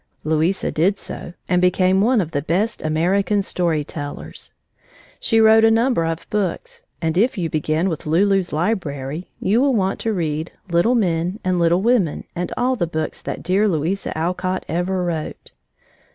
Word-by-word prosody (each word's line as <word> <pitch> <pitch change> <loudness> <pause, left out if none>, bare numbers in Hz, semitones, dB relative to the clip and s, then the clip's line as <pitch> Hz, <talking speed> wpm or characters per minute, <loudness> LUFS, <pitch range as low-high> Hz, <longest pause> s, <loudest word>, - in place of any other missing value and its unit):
Louisa 160 +5 +1
did 190 +6 +2
so 175 - -8
and 180 -1 +2
became 185 +1 +3
one 235 +1 +3
of 165 -3 -4
the 145 - -1
best 185 +9 -1
American 185 +6 +1
story 170 -5 0
tellers. 145 0 -7 0.7
She 225 - +2
wrote 220 0 +6
a 225 - +7
number 225 -5 +2
of 165 0 -3
books, 340 - -2 0.2
and 165 +2 +1
if 235 +2 +2
you 170 -4 -2
begin 155 +3 0
with 160 -4 -4
Lulu's 190 +3 +2
Library, 155 -4 -2
you 220 +6 +2
will 275 -1 +3
want 195 -2 0
to 225 - -1
read 160 -4 -2 0.2
Little 170 +9 +3
Men 180 -2 0
and 185 -1 +1
Little 170 +2 +3
Women 225 -10 +2
and 180 +1 -3
all 255 +1 +1
the 175 -8 -1
books 160 -1 -4
that - - -5
dear 195 +5 +2
Louisa 170 +1 -1
Alcott 180 +3 -2
ever 180 +3 -1
wrote. 160 -3 -4
180 Hz, 165 wpm, -21 LUFS, 160-205 Hz, 0.7 s, a